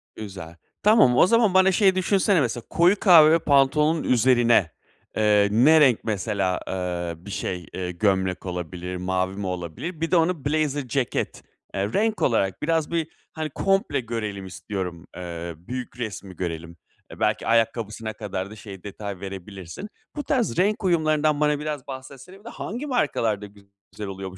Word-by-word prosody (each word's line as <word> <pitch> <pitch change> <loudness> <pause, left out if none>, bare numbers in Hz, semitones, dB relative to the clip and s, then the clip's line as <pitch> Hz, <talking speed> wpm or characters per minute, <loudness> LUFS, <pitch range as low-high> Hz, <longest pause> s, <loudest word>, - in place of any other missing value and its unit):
Güzel. 95 -6 -8 0.3
Tamam, 210 - +5
o - - +6
zaman 230 -2 +3
bana 190 0 +5
şey 190 0 +4
düşünsene 190 -1 +2
mesela, 120 -2 -2
koyu 180 +4 +3
kahve 165 -4 +7
pantolonun 150 +2 +3
üzerine, 120 -7 +3 0.5
eee, 105 -1 +4
ne 140 +9 +6
renk 125 -6 +4
mesela, 95 -3 -1
eee, 90 -2 -3
bir 100 - -7
şey, 90 -3 -4
eee, 90 -1 -3
gömlek 95 0 0
olabilir, 90 0 -5
mavi 95 +1 -1
mi 100 -1 -4
olabilir? 95 - -5
Bir 165 - -1
de - - +4
onu 165 -3 +1
blazer 145 -2 0
ceket, 130 -1 -2 0.3
eee, 100 +2 -2
renk 220 +1 +1
olarak 95 -6 +1
biraz 160 0 0
bir, 165 -2 0 0.3
hani, 155 -1 -3
komple 195 +5 +1
görelim 110 -5 -4
istiyorum, 90 -2 -6
eee, 85 -1 -6
büyük 125 +8 -7
resmi 100 -5 -6
görelim, 85 -1 -5 0.4
belki - - 0
ayakkabısına 115 -1 0
kadar 100 -3 -5
da - - -9
şey 100 -3 -11
detay 100 -1 -7
verebilirsin. 95 - -8 0.3
Bu 295 - -3
tarz 250 - 0
renk 205 +4 +1
uyumlarından 155 -4 +2
bana 150 -1 +2
biraz 150 -3 -5
bahsetsene. 135 +7 -10
Bir - - -22
de 235 - -7
hangi 240 +7 -5
markalarda 115 - 0 0.5
güzel 105 - -7
oluyor 95 -1 -6
bu 95 - -13
115 Hz, 160 wpm, -24 LUFS, 95-160 Hz, 0.5 s, kahve